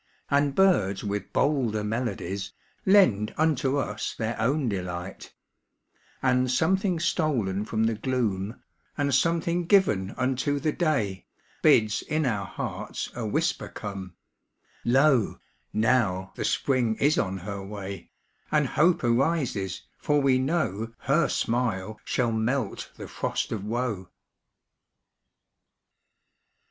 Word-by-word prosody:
And 140 0 +2
birds 105 - +3
with 100 0 -3
bolder 125 -8 +1
melodies 105 -4 -3 0.3
Lend 120 - +4
unto 145 -3 +2
us 105 -6 -3
their 115 +1 -2
own 135 +3 +1
delight; 90 -2 -5 0.9
And 130 -1 +3
something 180 +6 +2
stolen 125 - 0
from 110 0 0
the 115 0 +2
gloom, 110 -3 -2 0.3
And 140 -1 +1
something 170 +4 +1
given 110 - +3
unto 130 +2 0
the 155 +2 0
day, 135 - -1 0.3
Bids 110 -1 +4
in 155 0 -1
our 105 -6 -1
hearts - - -5
a 120 -3 -4
whisper 160 +10 0
come 95 -4 -7 0.7
â - - -2
âº - - +3 0.4
Loj - - -29 0.4
noiv 110 -5 +1
the - - -3
Spring 125 -5 +1
is 145 +5 +2
on 95 +1 -1
her 100 +2 -5
way^ 100 0 -7 0.4
And 150 -2 +3
hope 170 +6 +2
arises, 120 - 0 0.2
for 145 0 +2
we 135 -2 +3
know 125 - -1
' - - -50
Her 150 +5 +3
smile 110 -4 -1
shall 120 -3 0
melt 115 +5 -1
the - - -7
frost - - -2
of 105 -4 -3
woe. 110 -4 -2
120 Hz, 125 wpm, -27 LUFS, 100-145 Hz, 0.9 s, Lend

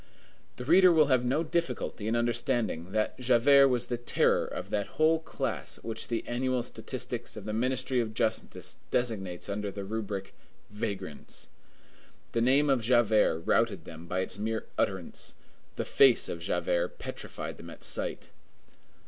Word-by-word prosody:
The 125 - -7
reader 180 +5 +7
will 155 -3 +4
have 125 -1 +3
no 135 +6 +1
difficulty 170 -9 -2
in 115 - +1
understanding 120 -7 0
that 110 +4 -1
Javert 130 +3 +6
was 125 -1 0
the 120 - -2
terror 120 - +2
of - - -6
that 100 -1 0
whole 160 +1 +4
class 160 - -3
which 115 -1 -4
the 115 -2 -3
annual 125 0 0
statistics - - -4
of - - -8
the 105 - -3
Ministry 130 +2 +1
of 110 -2 -2
Justice 110 -1 -1
designates 95 -8 -1
under 100 0 -3
the 100 0 -6
rubric, 100 -2 -4 0.4
Vagrants. 105 -8 -5 0.8
The 115 - 0
name 135 +5 +4
of 135 -3 +3
Javert 110 -7 +3
routed - - +1
them 80 +1 -10
by 90 +1 -1
its 95 - -2
mere 110 +1 -2
utterance; 95 -3 -2 0.4
the - - -2
face 135 -3 +5
of 85 - -4
Javert - - -1
petrified - - -6
them - - -10
at - - -11
sight. - - -2
120 Hz, 155 wpm, -29 LUFS, 105-130 Hz, 0.8 s, reader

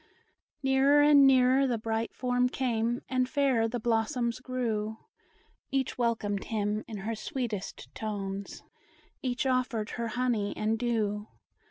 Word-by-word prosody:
Nearer 270 +2 +5
and 290 -2 +7
nearer 260 +1 +5
the 240 -2 0
bright 225 +1 -2
form 250 0 +1
came, 240 -2 -1
And 255 -1 0
fairer 265 -6 +2
the 240 +2 -3
blossoms 230 +1 0
grew; 225 -4 -2 0.7
Each 270 -1 -1
welcomed 220 -4 -1
him, 210 -1 -1
in 220 - -6
her 230 - -1
sweetest 220 -2 -5
tones; 200 -2 -5 0.6
Each 250 0 -1
offered 255 -4 0
her 235 -1 -3
honey 230 -3 -1
and 220 +1 0
dew. 215 -3 -1
235 Hz, 130 wpm, -29 LUFS, 220-255 Hz, 0.7 s, and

